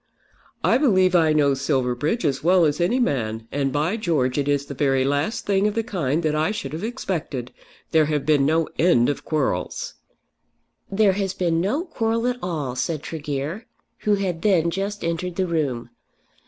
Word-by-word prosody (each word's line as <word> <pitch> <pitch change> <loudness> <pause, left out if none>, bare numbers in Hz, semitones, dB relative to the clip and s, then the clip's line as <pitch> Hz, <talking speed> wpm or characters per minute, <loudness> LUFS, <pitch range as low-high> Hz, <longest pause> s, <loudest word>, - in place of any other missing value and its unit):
"I 240 - +4
believe 185 -10 +3
I 165 -3 +4
know 145 -2 +3
Silverbridge 135 - 0
as 140 -2 0
well 180 0 +5
as 150 +1 0
any 200 +9 +2
man, 115 - -1
and 140 -1 0
by 155 +10 0
George 150 - 0
it 140 - -1
is 145 -1 +1
the 140 - -7
very 135 -1 +1
last 145 - -1
thing 200 0 +2
of 210 - -2
the 225 - 0
kind 170 - -1
that 155 -1 +1
I 155 +1 +1
should 210 -7 -4
have 165 +5 -5
expected. 175 - -4 0.4
There 160 -1 +4
have 150 -2 -1
been 150 -3 +3
no 160 +3 +2
end 155 -8 +4
of 145 - -3
quarrels." 155 -3 -2 1.0
"There 200 -1 +3
has 195 -1 -2
been 170 -3 +1
no 260 - 0
quarrel 230 -7 -1
at 250 0 -1
all," 150 -8 -3
said 150 +3 -2
Tregear, 150 - -4 0.3
who 210 -1 +2
had 185 -4 -2
then 170 -5 +3
just 200 +3 -3
entered 170 +1 -2
the 190 - 0
room. 140 -9 -2
160 Hz, 180 wpm, -23 LUFS, 145-195 Hz, 1.0 s, well